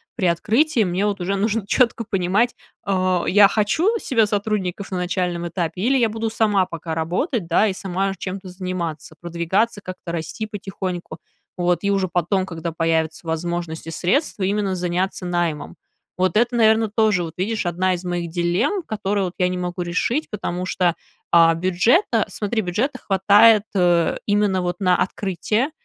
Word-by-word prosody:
при 185 Hz, -, 0 dB
открытии 225 Hz, -, +2 dB
мне 185 Hz, +3 st, 0 dB
в -, -, +2 dB
от 200 Hz, -, -7 dB
уже 195 Hz, +3 st, -1 dB
нужно 205 Hz, +1 st, -1 dB
четко 235 Hz, -2 st, +2 dB
понимать 195 Hz, +4 st, +1 dB, 0.3 s
а, 185 Hz, -2 st, +1 dB
я 200 Hz, +1 st, +6 dB
хочу 320 Hz, -, +1 dB
себя 230 Hz, -4 st, +2 dB
сотрудников 200 Hz, -2 st, -2 dB
на 185 Hz, -, -2 dB
начальном 180 Hz, -1 st, -2 dB
этапе 170 Hz, 0 st, -3 dB
или 265 Hz, +5 st, +3 dB
я 240 Hz, -3 st, +3 dB
буду 225 Hz, +1 st, -2 dB
сама 210 Hz, -4 st, +2 dB
пока 165 Hz, -2 st, -5 dB
работать, 180 Hz, -, -1 dB
да, 185 Hz, +6 st, +3 dB
и 190 Hz, -, -1 dB
сама 195 Hz, +1 st, -2 dB
чем-то 190 Hz, +1 st, -6 dB
заниматься, 180 Hz, -4 st, -5 dB
продвигаться, 175 Hz, +6 st, -1 dB
как-то 185 Hz, -2 st, -7 dB
расти 160 Hz, +6 st, -4 dB
потихоньку, 190 Hz, -5 st, -5 dB, 0.4 s
вот. 175 Hz, -1 st, +1 dB
И 200 Hz, -, +1 dB
уже 195 Hz, -1 st, +1 dB
потом, 180 Hz, +2 st, 0 dB
когда 165 Hz, -2 st, -5 dB
появится 160 Hz, 0 st, -1 dB
возможность 165 Hz, 0 st, -3 dB
и -, -, -4 dB
средства 190 Hz, -, 0 dB
именно 200 Hz, 0 st, 0 dB
заняться 180 Hz, +1 st, -2 dB
наймом. 175 Hz, -4 st, -2 dB, 0.4 s
Вот 185 Hz, +1 st, +1 dB
это, 240 Hz, +1 st, +2 dB
наверное, 220 Hz, -1 st, +4 dB
тоже 210 Hz, -4 st, +2 dB
вот, 165 Hz, -1 st, -6 dB
видишь, 215 Hz, +1 st, -1 dB
одна 185 Hz, +2 st, +1 dB
из 175 Hz, -, -8 dB
моих 175 Hz, -1 st, -2 dB
дилемм, 175 Hz, -, 0 dB
которые 205 Hz, -4 st, -1 dB
вот 180 Hz, -, -5 dB
я 180 Hz, 0 st, +2 dB
не 180 Hz, -, -3 dB
могу 180 Hz, 0 st, -3 dB
решить, 230 Hz, -, -1 dB
потому 185 Hz, -3 st, -4 dB
что, 175 Hz, -2 st, +1 dB, 0.4 s
а, 165 Hz, -1 st, +7 dB
бюджета 185 Hz, -, +2 dB
смотри, 220 Hz, +1 st, -2 dB
бюджета 210 Hz, +10 st, -2 dB
хватает, 205 Hz, +2 st, +5 dB
э, 175 Hz, -3 st, +3 dB
именно 205 Hz, -2 st, +2 dB
вот 175 Hz, 0 st, -2 dB
на 185 Hz, -2 st, +3 dB
открытие, 210 Hz, -, -1 dB
185 Hz, 165 wpm, -21 LUFS, 175-210 Hz, 0.4 s, а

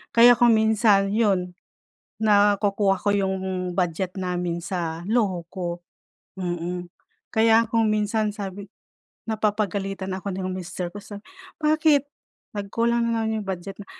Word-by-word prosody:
Kaya 235 Hz, +1 st, +9 dB
kung 240 Hz, -2 st, +6 dB
minsan 215 Hz, -2 st, +3 dB
yun, 200 Hz, -5 st, +1 dB, 0.7 s
nakukuha 205 Hz, -2 st, +3 dB
ko 205 Hz, -, -1 dB
yung 190 Hz, -2 st, -2 dB
budget 180 Hz, +1 st, -2 dB
namin 180 Hz, -2 st, -2 dB
sa 170 Hz, -1 st, -4 dB
luho 200 Hz, -7 st, 0 dB
ko, 175 Hz, -1 st, -5 dB, 0.6 s
mm. 175 Hz, -1 st, -3 dB, 0.5 s
Kaya 225 Hz, +1 st, +5 dB
kung 225 Hz, -1 st, +2 dB
minsan, 215 Hz, 0 st, +1 dB
sabi 200 Hz, -1 st, -7 dB, 0.6 s
napapagalitan 200 Hz, -3 st, -1 dB
ako 195 Hz, +1 st, -5 dB
ng 185 Hz, 0 st, -3 dB
mister 180 Hz, -1 st, -5 dB
ko 205 Hz, -, -9 dB
sabi, 205 Hz, 0 st, -10 dB, 0.4 s
"Bakit? 305 Hz, -2 st, +4 dB, 0.5 s
Nagkulang 230 Hz, +4 st, 0 dB
na 225 Hz, -, 0 dB
naman 220 Hz, 0 st, -1 dB
yung -, -, -12 dB
budget." 190 Hz, +1 st, -5 dB
Na 205 Hz, -, -10 dB
200 Hz, 130 wpm, -24 LUFS, 185-220 Hz, 0.7 s, Kaya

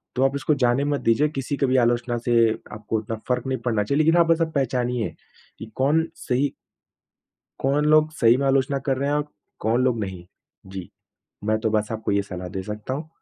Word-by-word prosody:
तो 130 Hz, -, +2 dB
आप 135 Hz, +1 st, +2 dB
इसको 140 Hz, +2 st, +1 dB
जाने 120 Hz, +3 st, +3 dB
मत 145 Hz, -1 st, -1 dB
दीजिए, 140 Hz, +7 st, +3 dB
किसी 140 Hz, -1 st, -3 dB
की 140 Hz, -, +2 dB
भी 130 Hz, 0 st, +2 dB
आलोचना 120 Hz, 0 st, 0 dB
से 120 Hz, -, +3 dB, 0.4 s
आपको 105 Hz, +1 st, -3 dB
उतना 110 Hz, +1 st, -4 dB
फ़र्क़ 125 Hz, +1 st, 0 dB
नहीं 130 Hz, -1 st, -1 dB
पड़ना 110 Hz, -4 st, +1 dB
चाहिए। 140 Hz, +7 st, 0 dB
लेकिन 165 Hz, +2 st, +4 dB
हाँ 170 Hz, -, +6 dB
बस 165 Hz, 0 st, +3 dB
आप 160 Hz, -1 st, 0 dB
पहचानिए 125 Hz, -5 st, 0 dB, 0.5 s
कि 110 Hz, -, -6 dB
कौन 150 Hz, +5 st, +2 dB
सही 135 Hz, +3 st, -1 dB, 1.1 s
कौन 140 Hz, +2 st, +1 dB
लोग 155 Hz, 0 st, +4 dB
सही 120 Hz, -5 st, +4 dB
में 140 Hz, +1 st, -1 dB
आलोचना 135 Hz, +1 st, +2 dB
कर 135 Hz, -, +2 dB
रहे 140 Hz, +1 st, -1 dB
हैं 145 Hz, -, +1 dB
और 150 Hz, 0 st, -1 dB, 0.3 s
कौन 120 Hz, +4 st, +1 dB
लोग 120 Hz, -3 st, +1 dB
नहीं। 95 Hz, -4 st, -5 dB, 0.4 s
जी, 95 Hz, -1 st, -7 dB, 0.6 s
मैं 110 Hz, 0 st, +2 dB
तो 110 Hz, -, 0 dB
बस 105 Hz, 0 st, 0 dB
आपको 110 Hz, -2 st, -2 dB
ये 100 Hz, 0 st, +2 dB
सलाह 90 Hz, 0 st, -5 dB
दे 95 Hz, -, -3 dB
सकता 105 Hz, +5 st, -5 dB
हूँ। 150 Hz, +3 st, -5 dB
130 Hz, 215 wpm, -23 LUFS, 110-140 Hz, 1.1 s, हाँ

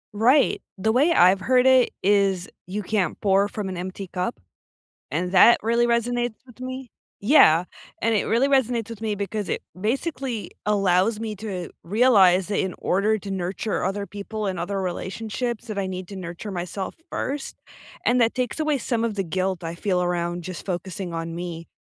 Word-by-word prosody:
Right. 255 Hz, +6 st, +4 dB, 0.2 s
The 220 Hz, +4 st, +1 dB
way 285 Hz, +9 st, +4 dB
I've 190 Hz, -, +5 dB
heard 255 Hz, +5 st, +3 dB
it 260 Hz, -2 st, +6 dB
is 195 Hz, -2 st, +2 dB, 0.2 s
you 205 Hz, +2 st, -3 dB
can't 195 Hz, -4 st, -1 dB
pour 200 Hz, 0 st, +3 dB
from 205 Hz, -1 st, -5 dB
an 185 Hz, -2 st, -5 dB
empty 185 Hz, +2 st, -5 dB
cup, 180 Hz, -, -2 dB, 0.7 s
and 180 Hz, +4 st, -1 dB
that 230 Hz, +6 st, +7 dB
really 235 Hz, +2 st, +2 dB
resonates 240 Hz, 0 st, 0 dB
with 245 Hz, 0 st, -17 dB
me. 255 Hz, -1 st, -6 dB, 0.3 s
Yeah, 180 Hz, -, +6 dB, 0.4 s
and 225 Hz, 0 st, +2 dB
it 205 Hz, -, +1 dB
really 240 Hz, +5 st, +2 dB
resonates 245 Hz, -5 st, +1 dB
with 225 Hz, -2 st, -8 dB
me 220 Hz, -2 st, -1 dB
because 205 Hz, 0 st, -3 dB
it -, -, -2 dB, 0.2 s
basically 255 Hz, -, -2 dB, 0.2 s
allows 200 Hz, +1 st, +2 dB
me 220 Hz, -1 st, -4 dB
to 195 Hz, -4 st, -5 dB
realize 195 Hz, -3 st, +4 dB
that 205 Hz, -, -1 dB
in 190 Hz, -1 st, -1 dB
order 210 Hz, +4 st, +1 dB
to 200 Hz, -, -8 dB
nurture 190 Hz, +2 st, -2 dB
other 200 Hz, +1 st, -2 dB
people 210 Hz, +1 st, -5 dB
and 185 Hz, -3 st, -2 dB
other 195 Hz, +2 st, -2 dB
relationships 225 Hz, +6 st, -4 dB
that 215 Hz, -2 st, -5 dB
I 195 Hz, -, 0 dB
need 185 Hz, -1 st, -5 dB
to 200 Hz, -, -9 dB
nurture 180 Hz, +3 st, -6 dB
myself 180 Hz, +1 st, -4 dB, 0.2 s
first, 280 Hz, +1 st, -3 dB, 0.5 s
and 250 Hz, +1 st, +3 dB
that 230 Hz, -1 st, +3 dB
takes 255 Hz, +4 st, -2 dB
away 305 Hz, -3 st, +1 dB
some 235 Hz, -2 st, -1 dB
of 230 Hz, -2 st, 0 dB
the 195 Hz, -1 st, -1 dB
guilt 185 Hz, +1 st, -2 dB
I 165 Hz, +1 st, -4 dB
feel 180 Hz, 0 st, 0 dB
around 175 Hz, -1 st, -1 dB
just 185 Hz, -1 st, -7 dB
focusing 180 Hz, -1 st, -4 dB
on 165 Hz, 0 st, -4 dB
me. 170 Hz, -1 st, -6 dB
200 Hz, 180 wpm, -24 LUFS, 185-230 Hz, 0.7 s, that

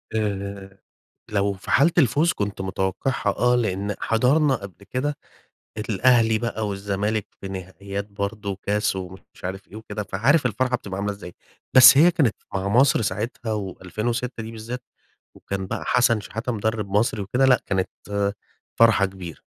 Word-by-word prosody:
آآ، 100 Hz, -2 st, -3 dB, 0.5 s
لو 100 Hz, -1 st, +1 dB
في 95 Hz, -, -9 dB
حالة 145 Hz, +6 st, +5 dB
الفوز 155 Hz, +4 st, +4 dB
كنت 100 Hz, -1 st, -4 dB
متوقعها، 95 Hz, +6 st, -1 dB
آه، 125 Hz, 0 st, +3 dB
لأن 100 Hz, -3 st, -1 dB
حضرنا 135 Hz, +6 st, +3 dB
قبل 100 Hz, -3 st, -8 dB
كده 145 Hz, +3 st, -1 dB, 0.7 s
الأهلي 115 Hz, +1 st, +4 dB
بقى 110 Hz, -2 st, -2 dB
والزمالك 100 Hz, +2 st, -2 dB
في 95 Hz, -, -6 dB
نهائيات 100 Hz, +1 st, -6 dB
برضه 100 Hz, -1 st, -4 dB
كاس 105 Hz, -1 st, 0 dB
ومش 95 Hz, 0 st, -7 dB, 0.2 s
عارف 95 Hz, +2 st, -5 dB
إيه -, -, -11 dB
وكده، 110 Hz, -1 st, -5 dB
فعارف 125 Hz, -, +2 dB
الفرحة 125 Hz, +3 st, 0 dB
بتبقى 100 Hz, -6 st, -7 dB
عاملة 105 Hz, 0 st, -1 dB
إزاي. 90 Hz, -3 st, -10 dB, 0.4 s
بس 130 Hz, +1 st, +10 dB
هي 170 Hz, +4 st, +7 dB
كانت 145 Hz, -11 st, +2 dB, 0.2 s
مع 95 Hz, 0 st, -1 dB
مصر 125 Hz, +2 st, +4 dB
ساعتها 110 Hz, +3 st, -3 dB
و2006 110 Hz, +5 st, -3 dB
دي 110 Hz, -, -7 dB
بالذات 115 Hz, +3 st, -6 dB, 0.5 s
وكان 95 Hz, -1 st, -5 dB
بقى -, -, -4 dB
حسن 120 Hz, -3 st, +3 dB
شحاتة 115 Hz, +4 st, -4 dB
مدرب 110 Hz, -1 st, -2 dB
مصر 105 Hz, +1 st, +1 dB
وكده 125 Hz, +7 st, +1 dB
لأ 130 Hz, -2 st, +5 dB
كانت 95 Hz, -2 st, 0 dB, 0.9 s
فرحة 115 Hz, -4 st, +5 dB
كبيرة، 95 Hz, -4 st, -9 dB
105 Hz, 145 wpm, -23 LUFS, 100-120 Hz, 0.9 s, بس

